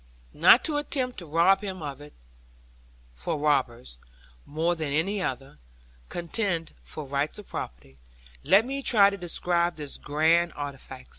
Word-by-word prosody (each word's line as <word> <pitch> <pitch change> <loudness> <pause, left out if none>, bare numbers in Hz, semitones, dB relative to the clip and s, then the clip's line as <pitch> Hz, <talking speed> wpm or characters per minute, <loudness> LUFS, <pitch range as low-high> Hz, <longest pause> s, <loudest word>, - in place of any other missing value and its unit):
Not 175 +10 +6
to 305 -3 0
attempt 260 -5 -2
to 170 - -10
rob 170 +5 +3
him 190 -4 -6
of 145 -1 -6
it 145 0 -13 1.0
for 60 - -3
robbers, 130 - -1 0.5
more 165 +4 0
than 155 -3 -3
any 190 +7 0
other, 135 - -5 0.5
contend 175 -1 -2
for 155 - -8
rights 140 +2 -2
of 210 - -10
property 65 +2 -8 0.4
let 195 +9 +5
me 275 +2 -4
try 205 -6 +5
to - - -4
describe 175 -1 -1
this 145 -2 -5
grand 160 +3 +2
artifice. 135 -2 -8
165 Hz, 145 wpm, -26 LUFS, 145-190 Hz, 1.0 s, Not